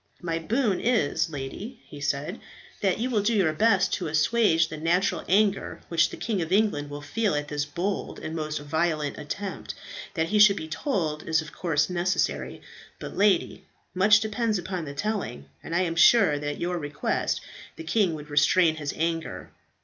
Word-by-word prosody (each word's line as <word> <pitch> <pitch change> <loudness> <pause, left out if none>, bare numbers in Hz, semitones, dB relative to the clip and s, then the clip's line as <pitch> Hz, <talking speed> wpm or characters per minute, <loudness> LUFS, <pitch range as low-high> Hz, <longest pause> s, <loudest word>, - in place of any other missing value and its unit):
"My 165 -1 -1
boon 215 +3 0
is, 230 -7 +1
lady," 160 - -7
he 145 - -11
said, 145 +7 -2 0.4
"that 195 -3 +2
you 245 +4 -2
will 215 -4 +2
do 225 +3 +1
your 180 -7 +2
best 200 +1 +3
to 180 - -1
assuage 160 +1 +3
the 155 - -7
natural 170 +5 +1
anger 200 +1 +2
which 170 0 +3
the - - -8
King 215 -6 -2
of 165 +1 -4
England 190 -8 +2
will 145 0 -7
feel 200 +4 0
at 145 0 -3
this 150 0 -1
bold 175 +7 -3
and 160 - -6
most 155 -1 -3
violent 155 0 -1
attempt. 150 - -5 0.4
That 165 0 0
he 210 - +2
should 205 -1 +7
be 160 - -5
told, 160 - -2
is 160 0 +3
of 155 - -11
course 150 -5 0
necessary; 180 +2 -1 0.3
but, - - -8
lady, 200 -2 +1 0.3
much 205 +3 +5
depends 220 0 0
upon 180 -2 -4
the 140 -1 -7
telling, 205 - -3 0.2
and 165 - -5
I 175 - +3
am 170 -2 -1
sure 180 -4 +5
that 145 0 -3
at - - -11
your 175 0 -1
request 145 -1 -1 0.4
the - - -8
king 175 0 +1
would 150 -1 -10
restrain 155 +3 +4
his 145 -2 -4
anger. 165 0 -3
170 Hz, 185 wpm, -26 LUFS, 150-205 Hz, 0.4 s, should